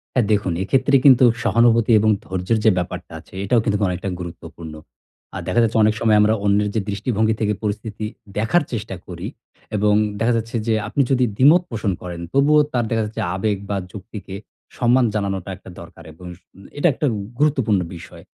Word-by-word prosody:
হ্যাঁ 125 -4 +2
দেখুন 100 -3 +1
এক্ষেত্রে 130 +7 +1
কিন্তু 130 -3 +7 0.2
সহানুভূতি 115 0 +3
এবং 110 +1 +3
ধৈর্যের 95 +4 -1
যে 110 - +6
ব্যাপারটা 90 0 -5
আছে - - -20
এটাও 115 +4 +3
কিন্তু 105 -3 +1
অনেকটা 90 +2 -3
গুরুত্বপূর্ণ। 85 -2 -9 0.6
আর - - -4
দেখা 120 - +2
যাচ্ছে 115 0 +1
অনেক 105 0 +3
সময় 110 -2 +4
আমরা 105 +1 +4
অন্যের 105 +1 +2
যে 110 - +1
দৃষ্টিভঙ্গি 110 +2 0
থেকে 105 -1 +1
পরিস্থিতি 105 0 -4 0.3
দেখার 110 +11 +2
চেষ্টা 110 -4 -4
করি 90 +1 -7 0.5
এবং 105 0 +2 0.3
দেখা 115 +2 +2
যাচ্ছে 115 +1 -3
যে 115 - +2
আপনি 140 - +1
যদি 130 -2 +3
দ্বিমত 150 +9 +6
পোষণ 110 -4 -1
করেন, 85 -1 -6
তবুও 145 +2 +4
তার 120 -2 0
দেখা 115 -1 +1
যাচ্ছে 105 - -6
আবেগ 100 +2 0
বা 100 - 0 0.2
যুক্তিকে 100 -1 -9 0.4
সম্মান 125 +1 +3
জানানোটা 100 -3 -2
একটা 95 - -14
দরকার - - -13
এবং 90 +2 -11 0.2
উম 100 - -15
এটা 160 - +4
একটা 145 - -1 0.3
গুরুত্বপূর্ণ 130 -9 +2 0.2
বিষয়। 85 - -12
110 Hz, 175 wpm, -21 LUFS, 100-120 Hz, 0.6 s, কিন্তু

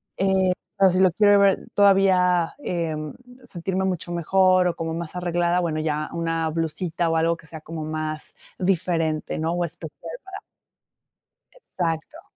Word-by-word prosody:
Eh, 190 -1 +2 0.2
pero 195 -1 +6
si 185 +1 +1
lo 185 -2 +5
quiero 205 +2 +5
ver 200 -1 +3
todavía, 185 -4 +4
em, 160 - -3 0.3
sentirme 190 -3 -3
mucho 180 -2 -3
mejor, 185 +1 +3
o 170 - -3
como 165 0 -3
más 170 +1 -6
arreglada, 175 0 +1
bueno, 160 -3 -1
ya 155 -1 -2
una 165 -1 -1
blusita, 165 +1 -2
o 165 - +1
algo 165 +1 +2
que 165 - -18
sea 160 0 -9
como 160 0 -6
más 155 0 -4 0.2
diferente, 165 -4 0
¿no?, 160 +1 -1
o 175 0 0
especial 165 +1 -8
para 380 0 -8 1.2
exacto. 180 - -4
170 Hz, 150 wpm, -24 LUFS, 160-185 Hz, 1.2 s, pero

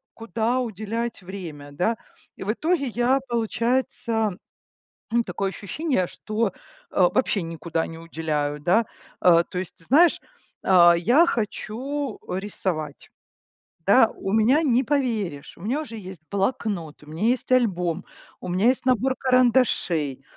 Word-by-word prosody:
куда 230 +2 -1
уделять 225 0 -3
время, 165 -7 -8
да. 180 +10 0 0.4
И - - -7
в 200 - 0
итоге 310 +1 0
я, 245 +3 +2
получается, 230 -2 0 0.8
м, 235 0 +3
такое 190 +1 -2
ощущение, 210 - -1
что, 215 +4 -2 0.4
э, 180 -2 +4
вообще 235 -6 +1
никуда 165 0 -3
не 165 - -9
уделяю, 155 -3 -2
да. 180 +9 +3 0.4
Э, 170 -1 +6
то 180 - -5
есть, 185 -1 -6
знаешь, 325 +6 +5 0.5
а, 175 -2 +7
я 245 - +4
хочу 245 +3 -3
рисовать. 180 -6 -4 0.8
Да, 225 +3 +6
у 195 - -5
меня, 225 +7 +4
не 260 -3 +2
поверишь, 225 - -2
у - - -15
меня 250 +9 -1
уже 230 -7 -7
есть 190 -5 -9
блокнот, 195 - -2
у - - -15
меня 160 +5 -7
есть 250 +1 0
альбом, 185 -9 +1 0.4
у - - -7
меня 185 +5 +1
есть 255 +2 +3
набор 255 +1 +2
карандашей, 240 - +2
215 Hz, 135 wpm, -24 LUFS, 175-250 Hz, 0.8 s, а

